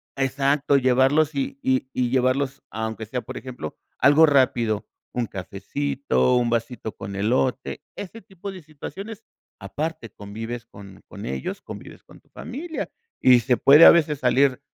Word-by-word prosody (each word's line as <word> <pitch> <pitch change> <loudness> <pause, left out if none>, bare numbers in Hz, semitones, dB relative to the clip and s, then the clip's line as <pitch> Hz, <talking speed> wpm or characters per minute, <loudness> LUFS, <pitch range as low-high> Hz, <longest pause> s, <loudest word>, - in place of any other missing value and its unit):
exacto, 140 +1 +1
llevarlos 135 +4 +3
y 135 0 -3
y 130 0 0
y 125 -1 0
llevarlos 130 +2 0
aunque 110 0 -4
sea, 125 +4 -4
por - - -8
ejemplo, 125 -12 -7 0.2
algo 145 +4 +6
rápido, 120 -7 +2 0.3
un 120 -2 -1
cafecito, 125 +8 -1
un 120 -1 +1
vasito 115 -1 -2
con 100 0 -7
elote, 125 +6 -1
ese 205 +3 -8
tipo 195 +1 -8
de 185 -3 -11
situaciones, 195 +9 -9 0.4
aparte 140 +5 -5
convives 115 +4 -7
con 100 -4 -14
con - - -9
ellos, 65 0 -4
convives - - -10
con - - -17
tu - - -34
familia, 315 +6 -6 0.3
y 125 -2 +6
se 125 0 +1
puede 150 +4 +8
a - - +12
veces 155 -3 +2
salir 130 +1 +3
130 Hz, 150 wpm, -23 LUFS, 115-145 Hz, 0.4 s, a